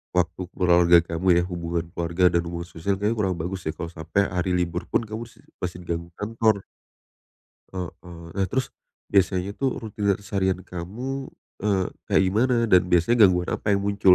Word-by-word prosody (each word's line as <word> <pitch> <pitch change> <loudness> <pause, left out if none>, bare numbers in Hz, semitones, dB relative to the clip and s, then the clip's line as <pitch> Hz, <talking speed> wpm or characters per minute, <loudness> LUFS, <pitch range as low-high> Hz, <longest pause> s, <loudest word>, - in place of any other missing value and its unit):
waktu 90 +1 0
keluarga 85 -1 +5
kamu 85 +2 -3
ya, - - -1
hubungan 85 -2 -3
keluarga 85 +1 +2
dan 85 - +3
hubungan 85 0 -4
sosial 90 +4 -2
kayaknya 105 +3 0
kurang 95 -3 +1
bagus 90 +2 -4
ya, - - +1
kalau 85 -1 -5
sampai 85 +4 0
hari 90 0 0
libur 90 -1 -1
pun - - +1
kamu 110 +1 -5
si - - -20
si - - -26
masih 90 -1 -3
diganggu 85 0 -3
kantor. 110 -2 +1 1.1
Heeh. 90 -2 -3 0.5
Nah, 95 -1 +1
terus 130 +8 -2 0.4
biasanya 95 -1 +2
tuh 135 -1 +1
rutinitas 100 -3 0
seharian 95 -2 0
kamu, 115 +11 -5 0.4
eee, 100 -3 +2 0.2
kayak - - +3
gimana 115 +7 +2 0.2
dan 90 -1 +7
biasanya 90 +8 +4
gangguan 90 -1 +1
apa - - -4
yang 100 - 0
muncul 100 -2 +5
95 Hz, 175 wpm, -25 LUFS, 85-100 Hz, 1.1 s, dan